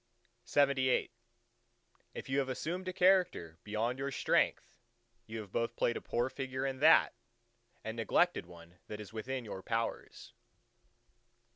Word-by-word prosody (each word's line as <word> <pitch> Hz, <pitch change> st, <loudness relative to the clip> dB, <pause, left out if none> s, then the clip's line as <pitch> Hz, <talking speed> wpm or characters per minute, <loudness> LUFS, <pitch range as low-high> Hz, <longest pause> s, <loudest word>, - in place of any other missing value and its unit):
LXXIX 135 Hz, -4 st, +2 dB, 1.0 s
If -, -, -6 dB
you 135 Hz, +1 st, +1 dB
have 135 Hz, -1 st, -1 dB
assumed 175 Hz, +8 st, -3 dB
a -, -, -1 dB
character 180 Hz, -, +2 dB
beyond 115 Hz, +4 st, -2 dB
your 140 Hz, +1 st, -2 dB
strength, 135 Hz, -, 0 dB, 0.5 s
you 110 Hz, 0 st, -5 dB
have 100 Hz, -3 st, -12 dB
both 115 Hz, +2 st, -1 dB
played 120 Hz, -, +1 dB
a -, -, -4 dB
poor 120 Hz, +1 st, -1 dB
figure 130 Hz, 0 st, -4 dB
in 135 Hz, -1 st, -3 dB
that, 155 Hz, +3 st, +6 dB, 0.7 s
and 110 Hz, +1 st, -5 dB
neglected 115 Hz, -, +2 dB
one 85 Hz, 0 st, -15 dB
that 105 Hz, -, -6 dB
is 105 Hz, 0 st, -9 dB
within 125 Hz, +3 st, -4 dB
your 95 Hz, -3 st, -6 dB
powers. 115 Hz, +3 st, -4 dB
125 Hz, 140 wpm, -33 LUFS, 110-140 Hz, 1.0 s, that